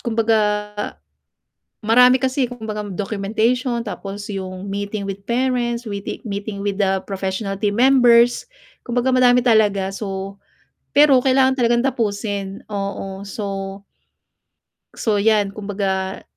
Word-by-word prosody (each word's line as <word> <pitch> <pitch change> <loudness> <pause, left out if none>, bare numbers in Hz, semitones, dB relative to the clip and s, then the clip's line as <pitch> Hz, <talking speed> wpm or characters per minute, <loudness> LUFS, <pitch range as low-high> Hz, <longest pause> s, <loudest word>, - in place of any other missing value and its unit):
Kumbaga, 225 -2 +1 1.5
marami 250 +3 +6
kasi 260 -1 0
kumbaga 220 -3 -5
documentation, 225 +5 -1
tapos 200 0 -6
yung 190 -1 -6
meeting 200 +1 -4
with 195 0 -6
parents, 240 0 -1
we-meeting 200 0 -5
with 200 0 -1
the 190 0 +2
professional 195 +1 -3
team 205 +2 -1
members. 245 - +5 0.3
Kumbagaa 245 +1 0
madami 250 -1 +5
talaga 200 -4 +3
so, 195 -1 -5 0.6
pero 285 -2 +6
kailangan 265 0 +3
talagang 235 0 +3
tapusin, 205 -5 -2
oo, 195 -1 -4
so 195 -1 -5 1.2
so 210 -3 0
yan 205 -2 +2
kumbaga, 195 -2 -3
210 Hz, 105 wpm, -20 LUFS, 195-240 Hz, 1.5 s, marami